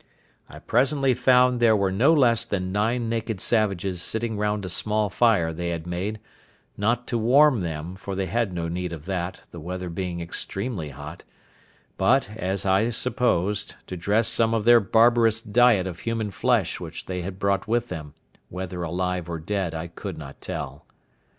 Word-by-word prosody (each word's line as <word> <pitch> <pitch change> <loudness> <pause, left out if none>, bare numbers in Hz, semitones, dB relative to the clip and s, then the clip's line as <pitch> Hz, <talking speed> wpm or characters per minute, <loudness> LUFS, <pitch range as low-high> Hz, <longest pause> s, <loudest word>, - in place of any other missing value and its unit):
I - - -11
presently 135 -1 +2
found 125 0 +4
there 115 -2 +5
were 100 -2 +1
no 120 +11 +4
less 120 -7 +4
than 95 -5 -3
nine 115 +4 0
naked 115 -2 -2
savages 95 -5 0
sitting 110 +3 -2
round 105 -1 -1
a - - -5
small 105 +3 -1
fire 100 -9 +3
they 85 +2 -3
had 85 -1 -4
made, 95 +5 -3 0.6
not 115 +4 0
to 120 - 0
warm 130 +1 +5
them, 85 +1 -4
for 100 0 -6
they 95 0 -1
had 115 0 -1
no 85 -2 -3
need 90 +1 -3
of 80 -2 -8
that, 90 -1 -4
the 85 - -9
weather 90 +2 -5
being 90 0 -4
extremely 95 - -4
hot, 65 - -9 0.7
but, 100 - +2
as 95 -2 -2
I 95 +4 +3
supposed, 110 -5 0
to 95 - -6
dress 100 +6 +1
some 115 0 +2
of 110 -2 -1
their 120 0 +8
barbarous 115 +2 +4
diet 115 -2 +3
of 90 -2 -6
human 115 -3 -2
flesh 115 -3 +1
which 80 -2 -7
they 90 -1 -4
had 90 +1 -6
brought 100 0 0
with 120 +1 0
them, 75 -4 -7 0.3
whether 90 0 -5
alive 90 +1 -2
or 85 - -3
dead 90 0 -2
I 80 +1 -4
could 85 - -7
not 70 -3 -10
tell. 70 +1 -6
100 Hz, 175 wpm, -25 LUFS, 90-115 Hz, 0.7 s, their